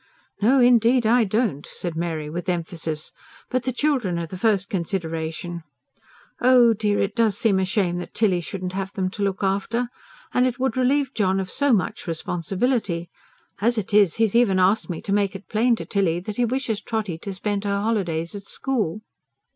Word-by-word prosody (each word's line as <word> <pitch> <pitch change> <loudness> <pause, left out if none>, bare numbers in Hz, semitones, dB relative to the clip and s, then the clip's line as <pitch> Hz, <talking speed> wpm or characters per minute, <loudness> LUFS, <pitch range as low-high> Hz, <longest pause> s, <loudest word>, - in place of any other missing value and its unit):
"No, 255 +6 +4
indeed 245 0 +5
I 230 +1 +4
don't," 210 - 0
said 175 -3 -5
Mary 160 -2 -3
with 175 +5 -4
emphasis. 165 -3 -3 0.4
"But 255 -1 0
the 260 - +1
children 250 - 0
are 170 - -2
the 165 - -8
first 200 -1 +1
consideration. 170 -2 -3 0.8
Oh, 245 -2 +6
dear! 210 -1 0
it 200 - -1
does 225 -4 +2
seem 200 -4 +2
a 190 - +1
shame 185 -3 0
that 175 - -8
Tilly 195 -5 +2
shouldn't 185 +1 -5
have 195 0 -4
them 190 -3 -1
to 205 - -7
look 200 0 -1
after. 200 +5 0 0.4
And 250 +1 +3
it 245 -1 -3
would 260 -3 0
relieve 265 +1 +1
John 195 -2 +1
of 185 -1 -3
so 285 -1 +2
much 200 -5 0
responsibility. 175 - -1 0.5
As 235 +3 +2
it 210 -1 -3
is, 205 -5 +5
he's 225 -3 +1
even 230 -5 +4
asked 195 +4 +2
me 170 - -5
to 195 - -1
make 200 -1 +1
it 195 - -9
plain 235 +3 +2
to - - -7
Tilly 180 -4 +1
that 205 +3 -6
he 245 - +3
wishes 235 -3 -2
Trotty 210 -8 -3
to 200 - -6
spend 200 +1 -2
her 200 -1 0
holidays 180 -7 -1
at 200 -1 -8
school." 215 -8 -2
200 Hz, 190 wpm, -23 LUFS, 180-230 Hz, 0.8 s, Oh